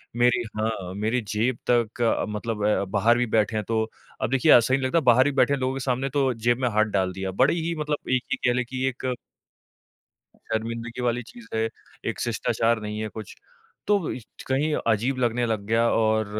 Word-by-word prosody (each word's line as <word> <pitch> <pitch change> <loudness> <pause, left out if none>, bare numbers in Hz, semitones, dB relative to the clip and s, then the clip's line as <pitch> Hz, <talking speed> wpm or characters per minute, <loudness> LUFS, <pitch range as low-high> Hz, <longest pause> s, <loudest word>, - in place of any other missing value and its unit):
मेरी 120 0 +3 0.2
हाँ, 105 -5 -2
मेरी 110 +4 0
जेब 115 +5 0
तक 120 -1 +1 0.3
मतलब 105 0 -3
अ, 105 - +2
बाहर 110 +4 +3
भी 125 - +2
बैठे 110 0 +2
हैं 105 - 0
तो 110 -1 +1 0.4
अब - - 0
देखिए, 135 +4 +4
अच्छा 120 +2 +6
नहीं 135 - +2
लगता, 130 +6 +2
बाहर 130 -2 +5
भी 145 - +1
बैठे 140 +1 +3
लोगों 130 -1 -1
के 135 - -3
सामने 130 +1 -1
तो 135 -2 +1
जेब 120 +1 +1
में 125 - +2
हाथ 110 0 +3
डाल 95 -1 +1
दिया। 95 0 -4
बड़ी 135 - +2
ही 170 - -1
मतलब 150 -1 -3
एक 130 -1 +2
ये - - -1
कह - - +2
लें 125 - 0
कि 130 +1 -4
एक 130 0 -2 1.4
शर्मिंदगी 115 +2 -3
वाली 120 0 0
चीज़ 120 -1 -14
है, 110 0 +1 0.4
एक - - -3
शिष्टाचार 115 0 0
नहीं 105 0 -4
है 110 - -3
कुछ। 110 -1 -9 0.5
तो 200 -5 +1
इछ 120 - -10
कहीं 145 +3 +1
अजीब 115 +4 +1
लगने 120 0 +1
लग 110 -2 -1
गया 115 +1 +3
और 110 -1 +2
120 Hz, 200 wpm, -25 LUFS, 110-130 Hz, 1.4 s, अच्छा